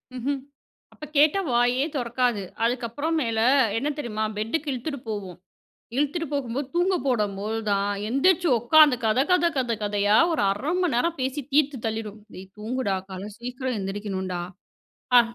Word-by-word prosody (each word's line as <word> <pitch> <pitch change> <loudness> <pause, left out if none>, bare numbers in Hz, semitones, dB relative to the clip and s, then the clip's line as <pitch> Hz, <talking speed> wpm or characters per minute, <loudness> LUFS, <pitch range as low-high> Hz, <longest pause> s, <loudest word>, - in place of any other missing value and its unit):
ம்ஹ்ம். 270 +3 -2 0.5
அப்ப 305 - -9
கேட்டா 305 +6 +5
வாயே 245 +2 +3
தொறக்காது. 240 -3 0 0.2
அதுக்கப்றம் 250 +7 -1
மேலு 230 -3 +1 0.3
என்ன 280 +6 0
தெரியுமா? 220 -5 -3
பெட்டுக்கு 265 +8 -2
இழுத்துட்டு 275 +2 -4
போகும். 195 -5 -5 0.6
இழுத்துட்டு 295 +4 0
போகும்போது 270 -1 -2
தூங்க 365 +2 +3
போடம்போது 210 -2 -1
தான் 200 0 +1 0.2
எந்திரிச்சு 345 +8 +3
உட்காந்து, 290 +3 +6
கத 220 +3 +3
கத 360 -2 +4
கத 245 -3 0
கதையா 205 0 +2 0.2
ஒரு 315 - 0
1/2 250 +11 -2
மணிநேரம் 335 0 0
பேசி 265 +3 -2
தீத்து 285 -1 +2
தள்ளிரும். 220 -1 -4
டேய் 190 +1 -10
தூங்குடா 220 -2 -1
கால 190 +2 -6
சீக்கிரம் 250 +1 -4
எந்திரிக்கணுன்டா. 190 -2 -3 0.8
ஆ. - - +10
245 Hz, 135 wpm, -25 LUFS, 215-285 Hz, 0.8 s, ஆ